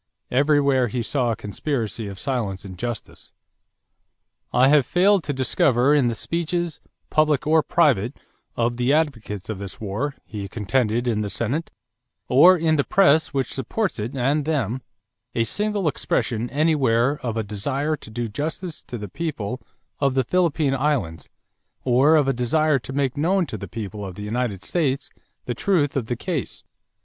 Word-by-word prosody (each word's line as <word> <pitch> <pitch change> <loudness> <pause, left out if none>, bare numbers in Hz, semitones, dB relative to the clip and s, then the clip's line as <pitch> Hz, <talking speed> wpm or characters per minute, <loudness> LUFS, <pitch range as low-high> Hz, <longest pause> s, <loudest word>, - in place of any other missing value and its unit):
Everywhere 140 -1 +3
he 120 +1 -2
saw 125 0 0
a 115 - 0
conspiracy 115 +1 -3
of 100 -1 -7
silence 105 -7 -3
and 95 - -7
injustice. 115 +5 -6 1.2
"I 130 - +5
have 145 -1 +5
failed 185 +6 +3
to - - -1
discover 130 0 +2
in 140 -4 +4
the 115 - -1
speeches, 170 +3 -2 0.3
public 155 -3 +2
or 160 +1 +4
private, 140 - +2 0.4
of 120 0 0
the 125 +3 +2
advocates 115 - -1
of 110 -3 -4
this 100 -2 -8
war," 110 +8 -3
he 100 -2 -6
contended 115 +3 0
in 110 -3 +1
the 105 - -2
Senate, 130 +11 -2 0.6
"or 175 +9 +7
in 160 -1 +2
the 140 - +3
press 160 -4 +4
which 135 -3 -2
supports 185 - -2
it 115 +6 -4
and 140 +4 +1
them, 130 -5 -1 0.5
a 115 - +2
single 205 - -1
expression 120 -4 -1
anywhere 140 -3 +2
of 115 -2 -3
a 110 - 0
desire 135 +9 -2
to - - -13
do 120 +2 -3
justice 155 - -4
to 120 - -7
the 105 -2 -6
people 125 - -4 0.4
of 135 -2 +1
the 130 - +3
Philippine 160 -2 +1
Islands, 135 - -1 0.5
or 130 +5 +4
of 150 -3 +3
a 135 - +2
desire 140 +4 +2
to 125 - -8
make 135 -1 -1
known 180 +5 +2
to - - -6
the - - -6
people 105 -2 -6
of 95 -2 -6
the 105 - -7
United 105 -3 -2
States 140 - -1 0.3
the 120 - -2
truth 150 - +1
of 125 -5 -1
the 120 - -1
case.... 165 -1 -4
130 Hz, 170 wpm, -23 LUFS, 115-150 Hz, 1.2 s, or